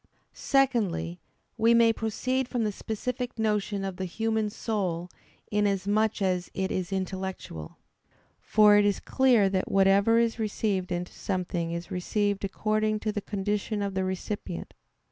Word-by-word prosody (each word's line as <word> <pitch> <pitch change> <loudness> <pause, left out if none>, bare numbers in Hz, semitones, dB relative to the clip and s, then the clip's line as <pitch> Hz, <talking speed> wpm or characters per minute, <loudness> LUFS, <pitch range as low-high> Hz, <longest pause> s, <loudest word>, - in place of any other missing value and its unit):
Secondly, 200 - +1 0.4
we 230 +1 +5
may 230 -1 +5
proceed 250 +4 -1
from 245 -2 -1
the 210 - 0
specific 245 +4 -4
notion 210 -2 0
of 190 -2 -5
the 190 - -3
human 220 +3 -1
soul 185 -6 -2 0.4
inasmuch 205 +1 +1
as 180 -2 0
it 190 0 -1
is 185 +1 -2
intellectual. 190 - -4 0.6
For 210 -1 +5
it 205 - +5
is 205 -1 +2
clear 250 -6 +3
that 190 -1 -1
whatever 195 +3 +4
is 230 0 +1
received 200 -3 -1
into 175 0 -3
something 180 -3 -2
is 170 +1 -5
received 205 +2 -1
according 215 +2 0
to 215 - -1
the 205 - -3
condition 205 +1 -2
of 200 -1 -2
the 190 0 0
recipient. 185 -1 -4
205 Hz, 145 wpm, -28 LUFS, 190-220 Hz, 0.6 s, we